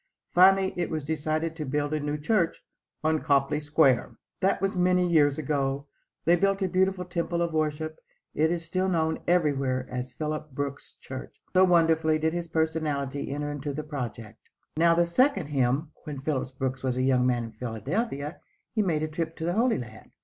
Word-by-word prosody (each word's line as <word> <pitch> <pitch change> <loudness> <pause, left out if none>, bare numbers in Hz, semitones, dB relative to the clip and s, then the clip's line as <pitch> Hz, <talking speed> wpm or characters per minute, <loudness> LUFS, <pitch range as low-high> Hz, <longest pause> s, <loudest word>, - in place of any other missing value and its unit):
Finally 190 +1 +5
it 175 - -1
was 155 -2 -3
decided 155 +2 -1
to 160 - -4
build 145 +2 -1
a 155 - +1
new 145 0 -2
church 170 +3 0 0.4
on 155 0 +2
Copley 140 +1 +2
Square. 145 -4 +2 0.2
That 190 - +2
was 195 0 -1
many 180 0 +3
years 145 -4 +4
ago. 140 -2 -1 0.4
They 170 +2 +6
built 195 +2 +1
a - - +2
beautiful 185 0 +1
temple 170 -1 -2
of 170 -1 0
worship. 155 0 -1 0.3
It 160 +2 +2
is 170 -1 -2
still 185 +3 0
known 160 -2 +1
everywhere 135 -7 +1
as 125 0 -4
"Phillips 155 +1 -4
Brooks' 140 +1 -5
Church," - - -8
so 185 +1 +6
wonderfully 160 -3 +3
did 160 +1 0
his 175 -1 -3
personality 155 -4 -1
enter 145 +1 -3
into 145 0 -4
the 155 +2 -4
project. 120 -7 -6 0.4
Now 165 +1 +4
the 170 +1 +4
second 190 - +2
"hymn." 140 +2 +1
When 145 -3 -5
Phillips 135 -3 -1
Brooks 130 0 -3
was 130 -1 -1
a 130 - +1
young 130 -1 +3
man 120 -2 +1
in 115 - -7
Philadelphia 140 - -3 0.3
he 220 - +2
made 160 -6 0
a - - 0
trip 160 +1 -4
to 160 - -4
the 175 - 0
Holy 230 +3 +2
Land. 110 -3 -9
155 Hz, 185 wpm, -27 LUFS, 140-170 Hz, 0.4 s, They